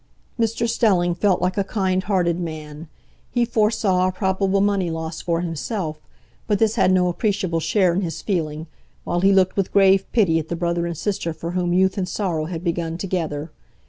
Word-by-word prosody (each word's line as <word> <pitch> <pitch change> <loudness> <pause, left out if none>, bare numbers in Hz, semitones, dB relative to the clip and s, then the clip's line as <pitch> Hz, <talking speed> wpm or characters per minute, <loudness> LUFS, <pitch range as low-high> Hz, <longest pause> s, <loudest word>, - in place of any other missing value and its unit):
Mr 230 +1 0
Stelling 185 -7 +2
felt 185 +1 +1
like 185 +2 0
a - - +2
kind 190 -2 0
hearted 175 -4 +1
man; 155 -2 -6 0.4
he 240 -1 +1
foresaw 215 -5 +2
a - - 0
probable 190 +1 0
money 195 -3 +1
loss 160 0 -4
for 170 -1 -1
himself, 165 -1 -3 0.5
but 210 -2 +2
this 220 +1 +2
had 200 -4 +3
no 185 -1 +3
appreciable 185 -2 0
share 185 +1 +2
in 185 - 0
his 170 -4 -4
feeling, 160 -5 -2 0.4
while 175 - -1
he 195 +2 +4
looked 190 -1 +3
with 195 -2 -1
grave 195 -1 +4
pity 185 -9 +3
at 160 - -6
the 170 - -3
brother 170 0 -1
and 170 -2 -5
sister 190 -4 -2
for 165 +1 -6
whom 175 -1 -1
youth 190 +2 +2
and 185 -1 -2
sorrow 170 -6 -2
had 165 0 -5
begun 170 -1 -2
together. 165 -5 -3
185 Hz, 190 wpm, -22 LUFS, 170-195 Hz, 0.5 s, he